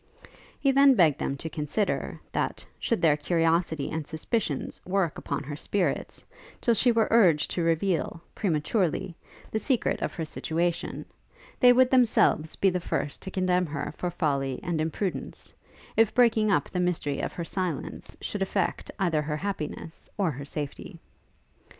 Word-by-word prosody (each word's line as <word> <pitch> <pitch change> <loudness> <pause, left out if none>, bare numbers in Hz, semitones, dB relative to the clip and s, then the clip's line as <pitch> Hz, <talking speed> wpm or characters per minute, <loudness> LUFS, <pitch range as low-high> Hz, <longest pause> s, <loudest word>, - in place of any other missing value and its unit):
He 275 - +3
then 275 0 +6
begged 160 - +4
them 140 - -2
to 160 - -6
consider, 160 +6 -2
that, - - -2
should 230 - -1
their 155 -3 +6
curiosity 165 -1 +1
and 160 -2 -3
suspicions 160 - -2
work 185 -3 0
upon 140 0 -3
her 145 +1 -5
spirits, 185 +5 -2 0.3
till 235 - +3
she 245 +3 +3
were 225 -1 +3
urged 180 -10 +4
to 175 - -1
reveal, 165 0 0
prematurely, 175 0 0 0.4
the 220 - 0
secret 245 +3 0
of - - -2
her 165 - -3
situation, 165 +2 -2 0.5
they 250 -1 +8
would 255 +1 +5
themselves 230 -10 +3
be 195 - +3
the 180 - -1
first 145 -4 -3
to - - -6
condemn 185 -1 +1
her 145 -1 -4
for 180 - -2
folly 140 -6 -1
and 175 -3 -1
imprudence, 170 +4 -4 0.4
if 225 -1 +3
breaking 225 -3 +4
up - - +2
the 180 - -3
mystery 175 -5 0
of - - -3
her 170 - -4
silence 175 -4 -4
should 205 - -4
affect 195 -1 -1
either 170 -6 +1
her 150 0 -2
happiness 165 -3 -5
or 190 -6 +1
her 140 0 -7
safety. 145 0 -6
175 Hz, 155 wpm, -27 LUFS, 155-200 Hz, 0.5 s, they